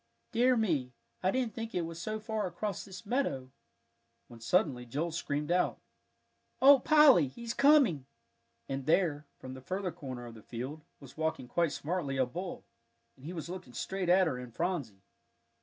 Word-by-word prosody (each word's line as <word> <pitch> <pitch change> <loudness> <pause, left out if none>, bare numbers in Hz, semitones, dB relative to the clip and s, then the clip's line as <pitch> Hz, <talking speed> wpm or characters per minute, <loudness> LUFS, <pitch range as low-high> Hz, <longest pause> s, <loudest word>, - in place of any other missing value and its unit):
"Dear 250 +1 +4
me, 150 - 0 0.3
I 185 - +2
didn't 245 0 0
think 225 +1 -6
it 175 - +1
was 165 0 -7
so 215 +4 -3
far 215 -2 -2
across 190 +2 -4
this 185 -2 -10
meadow!" 200 - -1 0.8
when 120 - -12
suddenly 130 - +1
Joel 145 +8 -3
screamed 150 -1 -2
out, 180 +1 +2 0.8
"Oh, 275 +1 +8
Polly, 300 - +6
he's 230 - -6
coming!" 270 - +4 0.6
and 135 0 -4
there, 155 -4 +2
from 130 0 -9
the 130 - -9
further 185 +5 -3
corner 130 -6 -7
of 120 - -9
the 110 - -12
field, 130 +8 -6 0.2
was 140 -1 -14
walking 160 -5 -2
quite 170 +4 +1
smartly 150 -4 -2
a 130 - +3
bull, 175 +9 -6 0.5
and 135 - -16
he 165 - -5
was 165 -2 -5
looking 175 -8 -8
straight 190 +6 -3
at 185 +1 +6
her 130 -7 -2
and 125 -2 -10
Phronsie. 145 - -2
170 Hz, 175 wpm, -31 LUFS, 130-200 Hz, 0.8 s, Oh